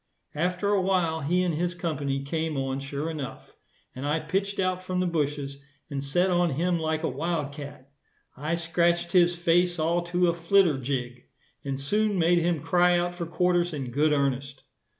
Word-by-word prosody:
After 180 +5 -1
a 205 -2 +3
while 180 -4 +1
he 175 +6 +1
and 175 -2 0
his 175 +3 -1
company 145 -5 -2
came 160 +1 -2
on 135 0 -2
sure 140 +3 -4
enough, 150 -5 -6 0.4
and 130 - -6
I 150 +3 +1
pitched 200 +4 -2
out 185 -1 0
from 185 0 -3
the 185 - +1
bushes 145 -4 -2 0.3
and 140 -1 -3
set 175 +7 +1
on 175 -1 +3
him 170 +4 0
like 160 0 -1
a - - +1
wild 150 +1 -2
cat. 145 -2 -9 0.5
I 150 +5 -2
scratched 170 +1 +1
his 175 -1 +4
face 175 +1 +2
all 165 +2 +1
to 175 +1 +1
a 170 - +2
flitter 170 -3 +3
jig, 125 -2 -4 0.4
and 135 -1 -3
soon 210 +8 +1
made 175 0 +4
him 170 -2 0
cry 175 0 +4
out 175 0 -1
for 175 -1 -5
quarters 175 0 +1
in 135 -4 -4
good 150 +5 +2
earnest. 140 -1 -1
165 Hz, 185 wpm, -27 LUFS, 140-175 Hz, 0.5 s, his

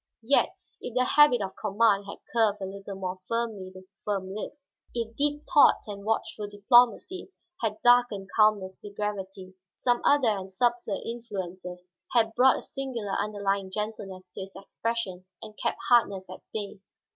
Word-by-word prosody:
Yet 275 +5 +3 0.3
if 245 - -7
the 255 - +4
habit 270 -6 +5
of 190 -1 -6
command 205 -1 +2
had 200 - -7 0.2
curved 220 -3 +3
a 195 - -4
little 195 +1 -7
more 185 -1 -4
firmly 225 -5 -2
the 185 0 -13 0.2
firm 195 -2 -2
lips, 280 +7 -8 0.2
if 230 -1 -3
deep 295 +2 +1
thoughts 290 - +5
and 200 -1 -7
watchful 215 -1 -2
diplomacy 240 - +3 0.3
had 215 -2 -1
darkened 240 -5 +4
calmness 210 -3 +3
to 205 - -8
gravity, 195 -2 -5 0.2
some 245 -1 +1
other 285 -5 +4
and 190 -1 -7
subtler 240 0 0
influences 185 -6 -6 0.3
had 225 -2 +3
brought 255 +3 +5
a - - -6
singular 245 -7 -5
underlying 200 -2 -1
gentleness 195 -3 -6
to - - -6
his 190 0 -9
expression 195 -2 -4
and 215 -1 -9
kept - - -2
hardness 200 -6 +3
at 185 - -9
bay. 205 -2 -5
210 Hz, 155 wpm, -27 LUFS, 195-235 Hz, 0.3 s, habit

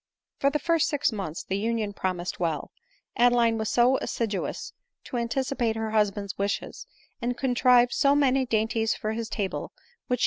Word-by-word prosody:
For 275 - +3
the 295 - 0
first 330 +1 +1
six 290 -4 +1
months 190 -7 -5
the 195 +1 -2
union 220 -1 -1
promised 185 -2 -3
well* 165 -4 -2 0.5
Ad 245 +1 +5
eline 230 -2 +3
was 220 - -1
so 245 +2 +4
assiduous 215 -4 -3 0.3
to 250 - -5
anticipate 235 -1 -1
her 220 -1 -3
husband's 205 -2 0
wishes, 200 - -3 0.3
and 245 +1 -1
contrived 245 -1 +4
so 280 -1 +3
many 270 -2 +3
dainties 225 0 +1
for 215 - -3
his 225 0 -4
table, 200 -4 -2
which - - -30
she - - -65
ADELINE 480 -1 -33
MOWBRAY. 250 - +1
230 Hz, 180 wpm, -26 LUFS, 210-255 Hz, 0.5 s, Ad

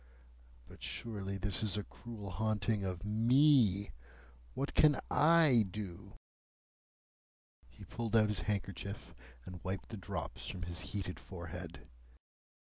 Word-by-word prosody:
But - - -14
surely 100 -4 -4
this 100 +1 0
is 105 -2 0
a 105 - -1
cruel 105 -4 -8
haunting 110 +2 0
of 95 0 -3
me. 115 -2 +4 0.6
What 140 +2 -2
can 150 -2 +5
I 155 -7 +6
do?" 95 -3 -7 1.6
He - - -12
pulled 115 -1 -3
out 110 -1 +5
his 105 -4 0
handkerchief, 100 -1 -3 0.3
and 90 -2 -9
wiped 95 +1 -4
the 110 - -6
drops 95 - -5
from 90 - -5
his 85 0 -4
heated 95 -1 -4
forehead. 85 -1 -8
105 Hz, 125 wpm, -35 LUFS, 95-115 Hz, 1.6 s, I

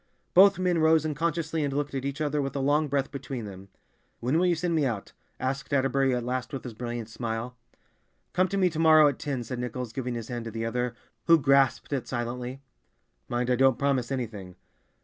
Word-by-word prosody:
Both 195 0 +7
men 180 -2 +1
rose 160 0 +4
unconsciously 160 +1 -1
and 140 - -1
looked 145 +1 -2
at 135 0 -3
each 140 +2 -3
other, 150 -1 0
with 135 0 -4
a - - -1
long 145 +3 +2
breath 140 -1 -1
between 135 -4 -5
them. 100 -1 -10 0.5
"When 130 +7 +1
will 180 - +3
you 175 - +3
send 170 +1 -1
me 155 -2 +2
out?" 115 -7 -3 0.3
asked 135 +5 -3
Atterbury 135 -1 +2
at 120 -1 -3
last 125 +1 -3
with 135 - -4
his 125 - -7
brilliant 120 0 -5
smile. 115 +2 -4 0.8
"Come 185 +1 +3
to 200 - -2
me 185 -2 +3
to 155 - -4
morrow 155 -2 +7
at 140 - -5
ten," 135 -4 -3
said 120 +2 -5
Nichols, 125 -1 -4
giving 125 -1 -3
his 115 0 -6
hand 120 -2 -4
to - - -4
the 115 +1 -3
other, 125 +1 -2 0.3
who 165 - +8
grasped 140 -1 +2
it 135 -4 -2
silently. 125 +2 -4 0.7
"Mind, 120 +1 0
I - - +4
don't 130 0 +4
promise 140 -3 0
anything." 105 -8 -5
135 Hz, 210 wpm, -27 LUFS, 120-150 Hz, 0.8 s, who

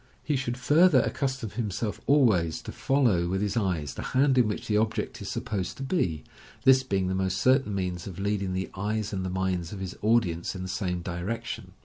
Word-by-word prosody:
He 150 - 0
should 130 -2 -2
further 150 +1 +5
accustom 130 -6 -2
himself 110 -2 -3
always 105 - +3
to - - -6
follow 120 -11 +2
with 95 +2 -1
his 105 +1 -1
eyes 90 - -1
the - - -6 0.2
hand 135 0 +4
in 120 - +4
which 105 - -3
the 105 - 0
object 110 +1 -1
is - - -5
supposed 95 -3 -3
to 135 - -5
be, 90 - -1 0.4
this 130 -1 +6
being 100 -8 -1
the 95 - -1
most 95 -1 0
certain 130 -1 +3
means 90 -2 -3
of 90 -3 -8
leading 100 -1 -1
the 95 0 -3
eyes 105 +2 -2
and 95 -1 -2
the 95 - -2
minds 90 -2 -1
of 100 - -6
his 95 -1 -5
audience 105 -6 +1
in 95 - -5
the - - -4
same 90 -2 -2
direction. 95 +3 -4
100 Hz, 210 wpm, -27 LUFS, 90-120 Hz, 0.4 s, this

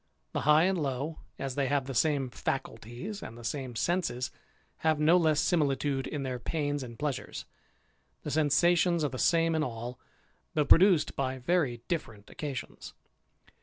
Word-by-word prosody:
The - - -2
high 150 +2 +7
and 185 -2 +1
low, 140 +3 -3 0.2
as 135 -1 -3
they 140 0 0
have 140 -1 +1
the 135 - -5
same 140 -1 +1
faculties 125 - -4
and 115 - -8
the 120 - -11
same 130 0 -4
senses, 130 -5 -1 0.5
have 155 -2 +1
no 155 +3 +5
less 160 -4 +3
similitude 140 -4 +1
in 145 -2 -4
their 130 -2 -3
pains 145 +1 -2
and 120 -3 -8
pleasures. 145 -4 -4 0.8
The - - -4
sensations 170 +3 +3
are 145 - +1
the 130 - -6
same 165 -1 +3
in 160 - +1
all, 120 -1 -5 0.6
though 150 -2 +3
produced 180 +1 +5
by 130 -1 -1
very 130 -3 0
different 115 - -4
occasions. 140 -4 -6
145 Hz, 160 wpm, -30 LUFS, 130-160 Hz, 0.8 s, high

